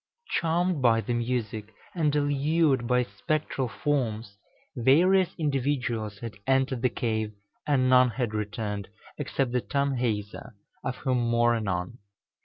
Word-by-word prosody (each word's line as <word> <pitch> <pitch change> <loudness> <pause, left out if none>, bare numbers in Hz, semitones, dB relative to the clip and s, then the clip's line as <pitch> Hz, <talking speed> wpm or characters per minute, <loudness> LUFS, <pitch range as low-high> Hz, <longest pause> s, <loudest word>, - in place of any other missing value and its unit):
Charmed 170 -1 +1
by 115 -2 +4
the 120 - -2
music, 110 -3 -3 0.2
and 150 -4 +1
allured 145 -2 +2
by 125 0 +3
the - - -12
spectral 150 -4 -1
forms, 115 -4 -2 0.4
various 170 +9 +4
individuals 130 -8 -1
had 115 -2 -5
entered 130 -2 +2
the 125 - +3
cave, 110 -4 -2 0.3
and 135 -3 +3
none 130 0 +6
had 120 -2 -2
returned, 105 -1 -3 0.3
except 135 -3 -1
the 125 0 +1
Tanhäuser, 125 -5 -2 0.3
of 125 - -2
whom 130 -1 0
more 120 0 +3
anon. 100 0 -3
125 Hz, 130 wpm, -27 LUFS, 115-140 Hz, 0.4 s, none